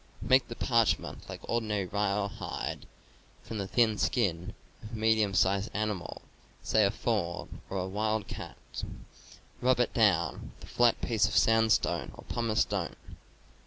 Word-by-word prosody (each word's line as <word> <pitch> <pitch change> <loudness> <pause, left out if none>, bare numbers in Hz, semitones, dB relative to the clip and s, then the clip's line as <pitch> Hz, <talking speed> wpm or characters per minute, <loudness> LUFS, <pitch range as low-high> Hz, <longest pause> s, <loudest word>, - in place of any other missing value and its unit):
Make 130 -1 +4
the 120 - -7
parchment 115 -3 0
like - - -8
ordinary 110 -4 0
rawhide, 100 +1 -2 0.6
from 110 - -6
the 100 - -3
thin 110 -1 +2
skin 95 -6 0 0.3
of 110 +1 -10
a - - -3
medium 110 -2 +2
sized 95 +3 +2
animal, 105 -4 -3 0.4
say 110 - +3
a 100 - +4
fawn 100 -7 -2
or 100 - -3
a 95 0 -2
wildcat. 105 +2 -3 1.0
Rub 125 -1 +3
it 125 - +1
down 95 -7 +1
with - - -12
a - - -13
flat 120 -1 +4
piece 115 -2 +2
of - - 0
sandstone 115 0 +3
or - - -11
pumice 115 -2 0
stone. - - -1
110 Hz, 145 wpm, -30 LUFS, 100-115 Hz, 1.0 s, Make